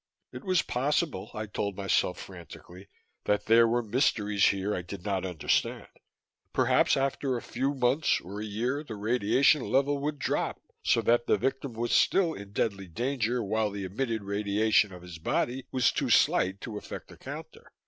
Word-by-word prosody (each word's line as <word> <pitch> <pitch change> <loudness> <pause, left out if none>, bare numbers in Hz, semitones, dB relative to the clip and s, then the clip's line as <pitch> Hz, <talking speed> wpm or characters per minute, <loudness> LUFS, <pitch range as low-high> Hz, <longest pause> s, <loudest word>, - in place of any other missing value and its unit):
_ - - -13
It - - -7
was 185 -5 +2
possible, 135 - -1
I 110 0 -3
told 100 -1 -3
myself 95 -2 +1
frantically, 90 +1 -11 0.4
that 105 0 +1
there 115 +1 +6
were 120 +1 +1
mysteries 105 -4 +1
here 100 +1 0
I 90 - -2
did 90 +2 -9
not 95 -2 -1
understand. 85 -4 0 0.7
Perhaps - - +3
after 135 -1 0
a - - -5
few 135 +4 -2
months 135 +4 +2
or 100 +4 -7
a - - -4
year, 120 +8 -2
the 115 -7 -7
radiation 120 +7 +3
level 140 +3 +1
would 150 +1 -2
drop, - - -1 0.2
so - - +2
that 120 0 +2
the - - +3
victim 135 +3 -2
was 120 +1 -2
still 175 -4 +3
in 100 -6 -9
deadly 100 -2 -1
danger 120 +4 -1
while 110 +1 0
the 100 -1 -5
emitted 110 +3 -2
radiation 105 +1 +2
of 90 -1 -11
his 85 -3 -9
body 125 +9 -1
was 130 -2 +3
too - - -1
slight 95 +1 +3
to 105 -3 -5
affect - - -9
the - - -13
counter. - - -10
110 Hz, 180 wpm, -28 LUFS, 100-130 Hz, 0.7 s, there